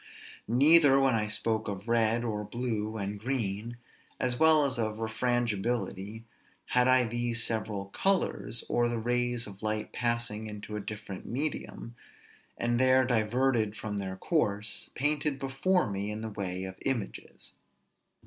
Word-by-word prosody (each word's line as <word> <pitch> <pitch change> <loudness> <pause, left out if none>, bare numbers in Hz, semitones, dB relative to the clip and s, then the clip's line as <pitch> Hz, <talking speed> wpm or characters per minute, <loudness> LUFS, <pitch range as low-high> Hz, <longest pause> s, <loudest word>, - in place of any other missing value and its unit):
Neither 140 +3 +6
when 135 -2 +3
I 105 -2 +1
spoke 110 +1 0
of 100 +1 -5
red, 115 0 +2
or 105 -3 -2
blue, 110 -1 -3
and 100 0 -4
green, 115 -1 -3 0.4
as 125 -1 0
well 160 -2 +6
as 130 -4 -1
refrangibility, 110 -2 -1 0.5
had 125 0 +3
I 130 0 +5
these 120 0 0
several 105 -3 -1
colors, 115 - 0
or 120 0 +2
the 120 - -1
rays 120 +1 0
of 100 -1 -10
light 110 0 -2
passing 115 -2 -1
into 105 0 -7
a - - -2
different 105 -2 -7
medium, 130 -3 -4 0.6
and 120 0 0
there 130 0 +5
diverted 115 -1 +1
from 105 -1 -4
their 95 -1 -3
course, 105 - -1
painted 145 +1 +1
before 135 +7 +1
me 100 +1 -3
in 105 +1 -4
the 110 -1 -4
way 95 -2 -4
of 95 0 -6
images. 125 -7 -4
115 Hz, 140 wpm, -30 LUFS, 105-125 Hz, 0.6 s, Neither